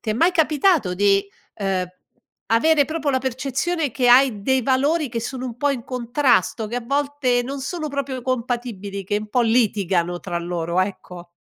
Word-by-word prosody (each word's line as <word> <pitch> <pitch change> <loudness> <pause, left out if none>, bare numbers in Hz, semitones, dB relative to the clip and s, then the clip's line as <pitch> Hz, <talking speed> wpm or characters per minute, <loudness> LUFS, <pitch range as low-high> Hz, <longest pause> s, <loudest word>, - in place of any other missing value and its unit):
Ti 220 - -3
è - - +2
mai 335 +9 +3
capitato 310 - +2
di, 200 +1 +3 0.3
uhm, 190 -2 -1 0.6
avere 285 +6 +3
proprio 310 -1 -2
la 260 - +2
percezione 270 +5 -2
che 245 +1 +1
hai 245 -4 +5
dei 265 +2 +2
valori 280 +5 +1
che 230 -1 -3
sono 255 +2 -5
un 240 -2 -7
po' 285 +3 +1
in 245 -4 -4
contrasto, 240 - +1
che 235 +3 -4
a 245 - -4
volte 275 -2 0
non 275 +2 -5
sono 310 +3 -4
proprio 280 -2 -4
compatibili, 235 -6 -3
che 205 +3 -1
un 210 0 -8
po' 245 - +1
litigano 195 -7 +1
tra 175 -2 -3
loro, 170 0 -2
ecco. 180 -2 -5
245 Hz, 180 wpm, -22 LUFS, 205-275 Hz, 0.6 s, hai